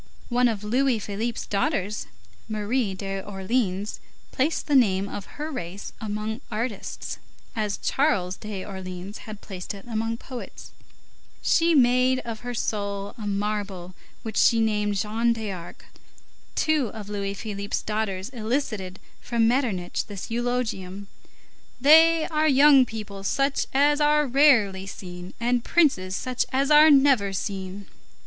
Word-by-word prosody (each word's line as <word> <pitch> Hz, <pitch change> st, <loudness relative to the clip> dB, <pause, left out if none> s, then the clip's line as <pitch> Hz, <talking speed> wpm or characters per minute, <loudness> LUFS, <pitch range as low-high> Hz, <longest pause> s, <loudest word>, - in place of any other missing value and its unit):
One 245 Hz, 0 st, +3 dB
of 215 Hz, -3 st, -2 dB
Louis 250 Hz, +3 st, +2 dB
Philippe's 215 Hz, +3 st, -3 dB
daughters, 210 Hz, -, -1 dB, 0.4 s
Marie 215 Hz, 0 st, -1 dB
d'Orleans, 195 Hz, +1 st, -2 dB, 0.3 s
placed 290 Hz, +5 st, 0 dB
the 295 Hz, -, -1 dB
name 200 Hz, -6 st, +4 dB
of 200 Hz, 0 st, -6 dB
her 305 Hz, +2 st, -4 dB
race 195 Hz, -, -6 dB
among 215 Hz, +1 st, -3 dB
artists, 225 Hz, -1 st, -4 dB, 0.4 s
as 210 Hz, -2 st, -1 dB
Charles 200 Hz, -11 st, +1 dB
d'Orleans 190 Hz, -1 st, -7 dB
had 215 Hz, -1 st, -8 dB
placed 190 Hz, 0 st, -7 dB
it 195 Hz, -, -12 dB
among 225 Hz, 0 st, -2 dB
poets. 250 Hz, 0 st, -9 dB, 0.7 s
She 335 Hz, 0 st, +3 dB
made 255 Hz, 0 st, +4 dB
of 230 Hz, -2 st, -6 dB
her 245 Hz, +1 st, -5 dB
soul 200 Hz, -2 st, -3 dB
a 215 Hz, -4 st, -6 dB
marble 200 Hz, -3 st, -3 dB, 0.3 s
which 220 Hz, -3 st, -5 dB
she 230 Hz, -, +5 dB
named 210 Hz, -2 st, +1 dB
Jeanne 225 Hz, +4 st, +1 dB
d'Arc. 200 Hz, -6 st, -7 dB, 0.7 s
Two 310 Hz, -5 st, +2 dB
of 210 Hz, -1 st, -8 dB
Louis 200 Hz, -1 st, -3 dB
Philippe's 200 Hz, -1 st, -4 dB
daughters 210 Hz, -2 st, -2 dB
elicited 220 Hz, -6 st, -3 dB, 0.2 s
from 230 Hz, -2 st, +1 dB
Metternich 230 Hz, -8 st, 0 dB
this 205 Hz, +1 st, -7 dB
eulogium: 220 Hz, -5 st, -2 dB, 0.7 s
"They 320 Hz, +4 st, +6 dB
are 310 Hz, -2 st, +1 dB
young 275 Hz, -2 st, +6 dB
people 210 Hz, -3 st, -7 dB
such 275 Hz, +7 st, 0 dB
as 290 Hz, +2 st, +3 dB
are 300 Hz, 0 st, +4 dB
rarely 240 Hz, -9 st, +4 dB
seen, 180 Hz, -1 st, -9 dB
and 240 Hz, 0 st, +1 dB
princes 195 Hz, -, +2 dB
such 255 Hz, +4 st, -1 dB
as 275 Hz, +3 st, +1 dB
are 300 Hz, +1 st, +8 dB
never 270 Hz, -8 st, +5 dB
seen." 195 Hz, 0 st, -4 dB
220 Hz, 130 wpm, -25 LUFS, 200-255 Hz, 0.7 s, are